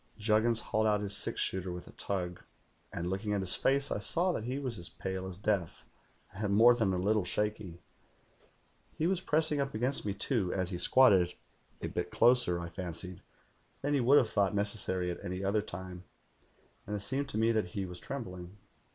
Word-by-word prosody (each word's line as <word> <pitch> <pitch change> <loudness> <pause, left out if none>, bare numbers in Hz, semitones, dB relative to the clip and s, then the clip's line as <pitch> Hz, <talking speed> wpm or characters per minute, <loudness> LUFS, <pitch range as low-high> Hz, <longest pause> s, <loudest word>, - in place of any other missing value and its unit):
"Juggins 110 +2 +2
hauled 110 +1 0
out 105 -1 +2
his 100 -1 -2
six - - -2
shooter 95 -1 -1
with 90 0 -7
a - - -11
tug, 90 -3 -3 0.5
and 85 - -4
looking 95 +3 -2
at 100 - 0
his 95 - -3
face, 140 +1 +1
I - - 0
saw 175 - +1
that 115 - -3
he 130 +3 -2
was 130 -7 -4
as 85 - -7
pale 95 0 -5
as 90 -2 -7
death 100 -5 -1 0.5
and 100 0 -1
more 120 +3 +8
than 110 -5 +1
a 95 - 0
little 105 +3 +2
shaky. 105 -3 -3 1.1
He 155 - 0
was 185 +1 +1
pressing 155 -4 +1
up 135 -3 -3
against 125 +5 0
me, 100 -2 -2
too, 105 -5 0
as 95 0 0
he 90 - -3
squatted, 95 -10 +5 0.5
a - - 0
bit - - -3
closer, 120 -8 +4
I 85 0 -5
fancied, 90 0 -5 0.6
than 145 +1 +1
he 140 - +3
would 135 +4 +6
have 115 -6 +3
thought 100 -1 +2
necessary 100 -3 -1
at 85 - -7
any 90 +2 -4
other 100 +2 +2
time, 90 -2 -8 0.8
and 105 - -2
it 100 - -4
seemed 135 +6 -1
to 110 - -4
me 115 +1 +3
that 110 -4 +1
he 95 - -1
was 90 -1 -8
trembling. 90 -8 -7
105 Hz, 200 wpm, -32 LUFS, 90-120 Hz, 1.1 s, more